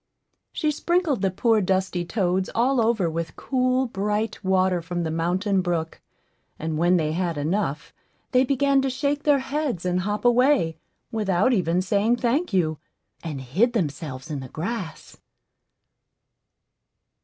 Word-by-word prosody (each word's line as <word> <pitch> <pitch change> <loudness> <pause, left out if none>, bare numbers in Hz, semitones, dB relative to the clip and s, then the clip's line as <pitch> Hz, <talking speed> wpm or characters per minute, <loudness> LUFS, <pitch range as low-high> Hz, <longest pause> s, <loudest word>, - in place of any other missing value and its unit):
She 305 -2 0
sprinkled 335 - 0
the 195 - +2
poor 220 +3 +2
dusty 185 -1 0
toads 185 0 0
all 250 +2 +3
over 220 -6 +2
with 165 -1 -4
cool, 255 0 +1
bright 210 0 -2
water 185 -1 +2
from 175 +1 -3
the 160 - -2
mountain 185 +4 0
brook; 170 -3 -3 0.6
and 160 -1 -3
when 175 +2 +4
they 155 -2 0
had 170 -1 -1
enough, 155 0 -2 0.4
they 255 0 +4
began 275 +1 +2
to 270 - 0
shake 280 +2 -1
their 290 -2 +5
heads 270 - -2
and 180 0 +1
hop 205 +5 -3
away, 245 - +3 0.3
without 210 +1 +1
even 180 -3 +1
saying, 205 +5 +2
"Thank 260 +8 0
you," 160 -5 +1 0.4
and 150 -5 -5
hid 190 - +1
themselves 150 - -3
in 145 - -3
the 130 -1 -8
grass. 180 - -5
190 Hz, 145 wpm, -24 LUFS, 170-245 Hz, 0.6 s, their